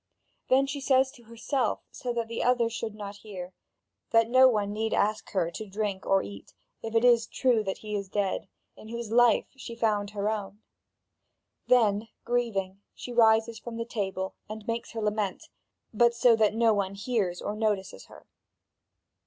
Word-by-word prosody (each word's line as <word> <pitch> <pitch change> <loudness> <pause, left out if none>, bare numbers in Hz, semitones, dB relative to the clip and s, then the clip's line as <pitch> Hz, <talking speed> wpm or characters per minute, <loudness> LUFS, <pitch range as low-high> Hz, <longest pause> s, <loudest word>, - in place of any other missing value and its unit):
Then 265 +1 +4
she 275 +1 -5
says 265 0 +3
to 240 -4 -18
herself, 230 +2 -2
so 250 - -4
that 235 -1 -2
the 230 0 -4
others 240 -2 +2
should 225 -2 -4
not 205 -1 -7
hear, 190 -4 -8 0.6
that 230 0 +3
no 260 +1 +8
one 205 -3 0
need 220 +1 -1
ask 215 +1 0
her 175 -4 0
to 215 +5 -7
drink 200 -1 -3
or 195 0 +3
eat, 100 -1 -11 0.3
if 225 0 -6
it 225 +2 +4
is 235 -2 +5
true 240 -4 +1
that 190 - -2
he 215 -1 -7
is 200 -2 -4
dead, 200 -1 -1 0.3
in - - -13
whose 235 -1 -6
life 240 0 +5
she 240 -3 -8
found 210 -3 0
her 205 0 -3
own. 210 0 -4 1.0
Then 220 -3 +3 0.2
grieving 200 -6 -1
she 245 - -7
rises 225 -1 +4
from 230 -1 -7
the 230 - -3
table, 190 -5 -3 0.2
and 215 0 -7
makes 230 0 -3
her 225 - -4
lament, 210 -2 -2 0.4
but 235 +2 +4
so 235 0 +5
that 215 -1 +2
no 225 -1 +4
one 200 -1 -1
hears 200 -4 -1
or 205 - -4
notices 210 - -2
her. - - -16
220 Hz, 180 wpm, -28 LUFS, 205-235 Hz, 1.0 s, no